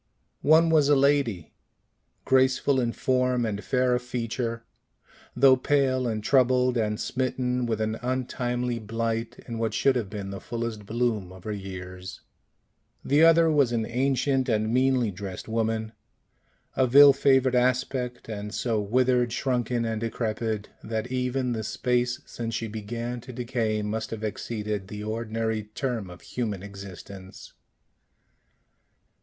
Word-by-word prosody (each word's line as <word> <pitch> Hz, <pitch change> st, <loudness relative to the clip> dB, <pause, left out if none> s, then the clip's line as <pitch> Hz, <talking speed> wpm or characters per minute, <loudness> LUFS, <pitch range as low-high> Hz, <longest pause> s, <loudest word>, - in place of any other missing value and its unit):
One 160 Hz, +2 st, +5 dB
was 150 Hz, -3 st, +4 dB
a 145 Hz, -, +6 dB
lady, 135 Hz, -, +1 dB, 0.7 s
graceful 130 Hz, +1 st, +3 dB
in 120 Hz, -2 st, 0 dB
form 125 Hz, -1 st, +1 dB
and 105 Hz, -2 st, -3 dB
fair 125 Hz, +5 st, +1 dB
of 125 Hz, -, +1 dB
feature, 115 Hz, -1 st, -3 dB, 0.7 s
though 130 Hz, +1 st, +6 dB
pale 130 Hz, -1 st, +1 dB
and 110 Hz, -2 st, -2 dB
troubled, 125 Hz, 0 st, +3 dB
and 105 Hz, -2 st, 0 dB
smitten 125 Hz, -1 st, -1 dB
with 110 Hz, -2 st, -1 dB
an 110 Hz, +1 st, -2 dB
untimely 125 Hz, -1 st, -2 dB
blight 115 Hz, +1 st, -3 dB
in 115 Hz, -2 st, -5 dB
what 115 Hz, -2 st, -1 dB
should 135 Hz, -1 st, +3 dB
have 115 Hz, -6 st, -2 dB
been 100 Hz, -2 st, -6 dB
the 100 Hz, -, -6 dB
fullest 115 Hz, -3 st, -5 dB
bloom 110 Hz, -5 st, -1 dB
of 95 Hz, -1 st, -13 dB
her 110 Hz, -, -4 dB
years; 95 Hz, -2 st, -7 dB, 0.8 s
the 145 Hz, +3 st, +3 dB
other 165 Hz, 0 st, +6 dB
was 140 Hz, -5 st, +3 dB
an 115 Hz, -2 st, 0 dB
ancient 130 Hz, +1 st, 0 dB
and 110 Hz, 0 st, +1 dB
meanly 130 Hz, -3 st, +2 dB
dressed 95 Hz, -1 st, -7 dB
woman, 110 Hz, -1 st, -1 dB, 0.8 s
of 130 Hz, 0 st, +1 dB
ill 140 Hz, 0 st, +10 dB
favored 135 Hz, -2 st, +3 dB
aspect, 125 Hz, 0 st, 0 dB
and 105 Hz, -1 st, -5 dB
so 115 Hz, -4 st, 0 dB
withered, 125 Hz, +3 st, +2 dB
shrunken, 120 Hz, -2 st, -1 dB
and 110 Hz, -1 st, -2 dB
decrepit, 110 Hz, -2 st, -2 dB
that 110 Hz, +2 st, -3 dB
even 125 Hz, 0 st, -1 dB
the 110 Hz, -2 st, -2 dB
space 125 Hz, +3 st, 0 dB
since 115 Hz, -1 st, -5 dB
she 115 Hz, -, -2 dB
began 115 Hz, +3 st, -5 dB
to 130 Hz, -, -10 dB
decay 115 Hz, -3 st, -1 dB
must 110 Hz, +1 st, -3 dB
have 110 Hz, -1 st, -6 dB
exceeded 105 Hz, -2 st, -3 dB
the 105 Hz, +1 st, -7 dB
ordinary 110 Hz, 0 st, -2 dB
term 120 Hz, -8 st, -2 dB
of 90 Hz, 0 st, -12 dB
human 105 Hz, -6 st, -4 dB
existence. 95 Hz, -1 st, -10 dB
120 Hz, 140 wpm, -26 LUFS, 110-130 Hz, 0.8 s, ill